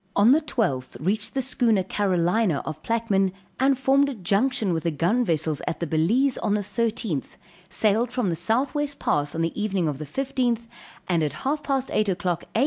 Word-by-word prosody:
On 205 +4 +6
the 305 +4 +5
12th, 180 - -2
reached 195 - -1
the 265 - 0
schooner 235 -6 +2
Carolina, 180 -2 +1
of 155 0 -6
Plaquemine, 200 -4 +1 0.3
and 265 +1 +3
formed 275 +2 +3
a 275 - -5
junction 210 +2 +1
with 165 - -1
the 170 - 0
gun 175 - +1
vessels 160 -6 0
at - - -2
the 170 - -1
Balize 210 - +2
on 205 - +1
the 210 - 0
13th, 215 - -2 0.3
sailed 220 +4 +2
from 245 -6 0
the 170 - 0
southwest 275 - 0
pass 145 +1 0
on 165 - 0
the 165 +6 -2
evening 195 -5 0
of 145 -2 -3
the 155 - -5
15th, 245 - -1 0.4
and 170 -3 +1
at 150 -2 -1
half 295 +3 0
past 270 -2 -1
8 215 -1 +2
o'clock, 180 -2 -1
A. - - +3
210 Hz, 195 wpm, -25 LUFS, 170-250 Hz, 0.4 s, On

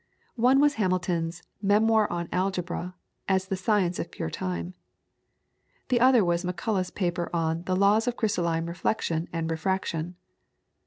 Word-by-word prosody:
One 255 +3 +5
was 290 0 +4
Hamilton's 180 -3 -1 0.2
"Memoir 215 +1 +3
on 170 -1 -3
Algebra, 180 -1 -2 0.3
as 190 -1 +2
the 195 - 0
Science 185 -2 +1
of 170 - -3
Pure 80 - -5
Time." 90 -1 -4 1.2
The 245 - +3
other 250 -4 +5
was 170 0 +1
Macullagh's 185 +1 -1
paper 175 -2 -2
on 165 0 -1
the 185 - 0
"Laws 205 +4 +3
of 245 - -1
Crystalline 170 -7 0
Reflection 170 -1 -1
and 165 -1 -2
Refraction." 170 0 -2
180 Hz, 140 wpm, -27 LUFS, 170-205 Hz, 1.2 s, One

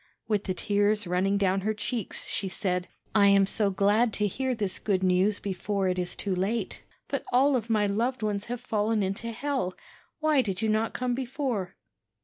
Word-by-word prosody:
With 210 -2 0
the 185 - -2
tears 205 +1 +1
running 185 +3 +1
down 195 -1 +1
her 215 +2 -1
cheeks, 220 0 -2
she 195 - -3
said: 180 -2 -2 0.3
'I 205 -2 +6
am 200 0 +6
so 205 +1 +2
glad 205 +4 +2
to 210 - 0
hear 255 +5 -1
this 205 -4 -2
good 190 -3 0
news 185 +3 +2
before 195 0 -2
it 180 0 -1
it 180 -1 -1
too 200 - -1
late; 195 +6 -2 0.3
but - - -2
all 265 +3 +4
of 235 -2 -2
my 215 -2 +3
loved 230 +4 -1
ones 205 -1 -1
have 245 0 -5
fallen 215 0 0
into 195 +5 -3
hell. 245 -6 -2 0.4
Why 310 -3 +3
did 195 -6 -3
you 220 - 0
not 220 +1 0
come 250 -1 0
before?' 245 -7 -3
205 Hz, 190 wpm, -28 LUFS, 195-230 Hz, 0.4 s, I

